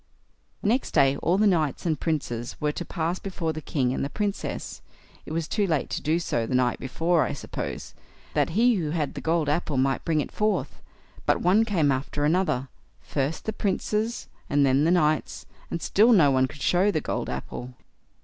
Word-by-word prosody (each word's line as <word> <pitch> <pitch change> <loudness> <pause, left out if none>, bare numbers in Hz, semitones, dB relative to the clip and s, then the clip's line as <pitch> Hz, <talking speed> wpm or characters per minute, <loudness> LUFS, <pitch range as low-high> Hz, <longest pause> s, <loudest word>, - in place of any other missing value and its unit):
Next 235 +6 0
day 135 -2 +5
all 175 +6 +1
the 215 - +3
knights 165 -6 +1
and 160 -4 0
princes 120 -7 -3
were 150 -1 +1
to 175 - -5
pass 170 +1 -2
before 170 -5 -3
the 155 - -6
king 130 -4 0
and - - -2
the 140 - -2
Princess—it 200 -3 -6
was 160 0 -2
too 205 -2 0
late 155 -5 -1
to - - -2
do 155 +3 +1
so 120 -9 -1
the 130 - -1
night 125 -1 +2
before, 165 +5 +1
I - - 0
suppose—that 140 - -5
he 230 +5 +3
who 160 -5 -2
had 150 -2 -1
the - - -6
gold 160 -2 +1
apple 150 -1 0
might 135 +1 +1
bring 160 -2 +1
it 145 - -3
forth; 215 0 -1 0.5
but - - +3
one 195 +6 +4
came 165 -10 +2
after 140 +2 -1
another, 155 -5 +1 0.3
first 140 +2 -3
the 220 - -2
princes, 215 +3 -1 0.2
and 145 0 +3
then 135 +2 +3
the - - +3
knights, 155 -3 +1 0.2
and 170 - -4
still 220 +5 +4
no 155 -9 +6
one 130 0 +3
could 135 +1 -9
show 185 +3 +3
the 160 - +1
gold - - -3
apple. 125 +1 -6
160 Hz, 190 wpm, -26 LUFS, 140-185 Hz, 0.5 s, no